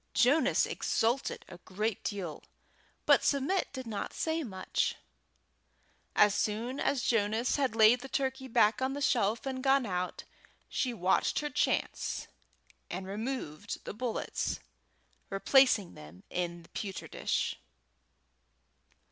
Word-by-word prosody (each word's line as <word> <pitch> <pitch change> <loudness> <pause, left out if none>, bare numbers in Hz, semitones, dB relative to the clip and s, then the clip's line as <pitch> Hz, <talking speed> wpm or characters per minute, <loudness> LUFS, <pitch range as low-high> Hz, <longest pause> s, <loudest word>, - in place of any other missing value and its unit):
Jonas 280 +6 +4
exulted 240 +4 0
a 175 -1 -11
great 210 +4 -3
deal, 190 -7 -4 0.6
but - - +5
Submit 285 +7 +1
did 260 -2 -6
not 210 -3 -4
say 320 0 0
much. 190 -9 -1 1.2
As 210 -1 +6
soon 225 +6 -1
as 275 -3 +1
Jonas 225 +3 +1
had 265 -5 0
laid 225 +2 +6
the 270 - -8
turkey 265 -1 -1
back 230 0 +3
on 260 +1 0
the 285 - -4
shelf 230 -4 +1
and 260 -1 -3
gone 270 -1 +4
out, 180 -3 -3 0.4
she 255 - -1
watched 190 -5 +1
her 295 0 -3
chance - - -1 0.6
and 185 +2 -4
removed 205 - -5
the - - -5
bullets, 235 +1 -2 0.7
replacing 210 -1 +4
them 75 +4 -13
in 175 -1 -3
the - - -19
pewter 195 -3 -5
dish. - - -1
225 Hz, 125 wpm, -31 LUFS, 195-265 Hz, 1.2 s, As